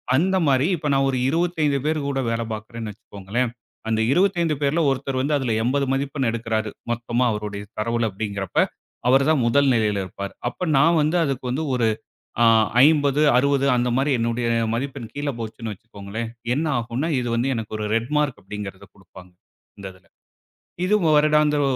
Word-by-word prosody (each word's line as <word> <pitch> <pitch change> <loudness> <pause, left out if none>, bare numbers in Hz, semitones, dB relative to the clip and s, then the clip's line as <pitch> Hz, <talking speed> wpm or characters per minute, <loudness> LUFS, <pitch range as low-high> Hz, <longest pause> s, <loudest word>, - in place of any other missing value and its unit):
அந்த 185 +7 +2
மாரி, 135 0 +3
இப்ப 150 -2 -4
நான் 135 0 +3
ஒரு 130 - -1
25 160 -3 +1
பேர் 155 0 +1
கூட 135 -1 -1
வேலை 115 0 -1
பாக்குறேன்னு 110 0 -6
வச்சுக்கோங்களேன். 105 +4 -4 0.4
அந்த 110 0 +1
25 175 -3 +2
பேர்ல 145 +4 +1
ஒருத்தர் 135 0 -2
வந்து 145 +3 0
அதுல 130 -4 -1
80 140 +3 +1
மதிப்பெண் 135 -1 -1
எடுக்கிறாரு! 110 -1 -2 0.2
மொத்தமா 120 +1 -1
அவருடைய 105 -1 -4 0.2
தரவுல 115 +1 0
அப்படிங்கிறப்ப, 100 -1 -5 0.5
அவர் 135 +2 +5
தான் 155 -4 +3
முதல் 140 +3 +3
நிலையில் 105 -3 +1
இருப்பார். 100 +1 -7 0.2
அப்ப 180 +6 -5
நான் 165 +4 +4
வந்து 155 +4 +1
அதுக்கு 135 -3 -3
வந்து 145 +6 -1
ஒரு 115 -3 +2 1.0
50,60 140 -2 +3
அந்த 125 0 +1
மாரி 140 +2 +1
என்னுடைய 115 +1 -1 0.2
மதிப்பெண் 130 -1 -4
கீழ 145 0 -2
போச்சுன்னு 110 -1 -5
வச்சுக்கோங்களேன், 110 +2 -7 0.3
என்ன 155 - 0
ஆகும்னா, 120 +7 -3
இது 120 - -3
வந்து 120 +3 0
எனக்கு 110 -1 -5
ஒரு 105 - -3
ரெட்மார்க் 140 +4 0
அப்படிங்கிறதை 95 -1 -8
குடுப்பாங்க, 90 -1 -16 0.5
இந்த 95 - -7
இதுல. 90 -2 -23 0.8
இது 210 - +2 0.2
வருடாந்திர 150 -1 +3
125 Hz, 155 wpm, -23 LUFS, 110-145 Hz, 1.0 s, அவர்